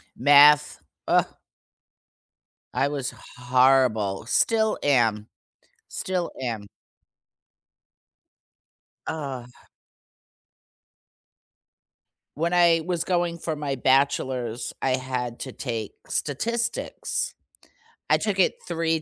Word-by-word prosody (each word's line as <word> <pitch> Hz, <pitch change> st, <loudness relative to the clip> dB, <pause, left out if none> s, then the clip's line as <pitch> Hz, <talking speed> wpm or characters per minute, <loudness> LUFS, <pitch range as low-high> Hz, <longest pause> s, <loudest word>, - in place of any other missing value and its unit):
Math, 145 Hz, +2 st, +6 dB, 0.3 s
Ugh. -, -, +4 dB, 1.5 s
I 140 Hz, -, +1 dB
was 140 Hz, -3 st, -3 dB, 0.3 s
horrible 125 Hz, -5 st, +2 dB
still 220 Hz, -, +2 dB
am. 115 Hz, -6 st, +2 dB, 0.6 s
Still 180 Hz, -2 st, -3 dB
am. 115 Hz, -5 st, -4 dB, 2.4 s
Ugh. 135 Hz, -6 st, -5 dB, 2.9 s
When 170 Hz, +2 st, 0 dB
I 170 Hz, -2 st, +4 dB
was 175 Hz, -2 st, -1 dB
going 175 Hz, -1 st, -1 dB
for 160 Hz, -1 st, -3 dB
my 145 Hz, -2 st, -3 dB
bachelor's, 130 Hz, -3 st, 0 dB
I 130 Hz, -1 st, +1 dB
had 125 Hz, -2 st, -4 dB
to 130 Hz, -, -6 dB
take 115 Hz, -5 st, -5 dB
Statistics. 230 Hz, -, -2 dB, 0.8 s
I -, -, +6 dB
took 200 Hz, -3 st, -2 dB
it -, -, +2 dB
3 165 Hz, -2 st, -1 dB
140 Hz, 80 wpm, -25 LUFS, 125-165 Hz, 2.9 s, Math